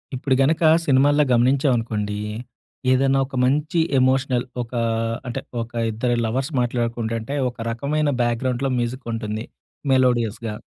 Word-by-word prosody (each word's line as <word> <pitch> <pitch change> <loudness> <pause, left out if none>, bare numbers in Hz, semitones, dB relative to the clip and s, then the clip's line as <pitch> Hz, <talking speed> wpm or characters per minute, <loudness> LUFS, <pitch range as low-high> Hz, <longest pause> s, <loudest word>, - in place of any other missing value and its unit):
ఇప్పుడు 130 +1 0
గనక 155 +5 +2 0.2
సినిమాల్లో 145 +2 +4
గమనించామనుకోండి. 120 -5 +1 0.7
ఏదైనా 135 +1 +3
ఒక 135 - -10
మంచి 150 +6 +1 0.2
ఎమోషనల్ 130 -1 +2 0.2
ఒక 115 - -7 0.6
అంటే, 120 - -3 0.2
ఒక 115 +1 -7 0.2
ఇద్దరు 120 +3 -1
లవర్స్ 130 +6 -2
మాట్లాడుకుంటుంటే 115 0 -2 0.2
ఒక 120 - -15
రకమైన 145 +6 -1
బ్యాక్‍గ్రౌండ్‌లో 125 +3 0
మ్యూజిక్ 120 +2 -3
ఉంటుంది. 110 -1 -3 0.5
మెలోడియస్‌గా. 120 -4 +1
125 Hz, 115 wpm, -22 LUFS, 115-135 Hz, 0.7 s, సినిమాల్లో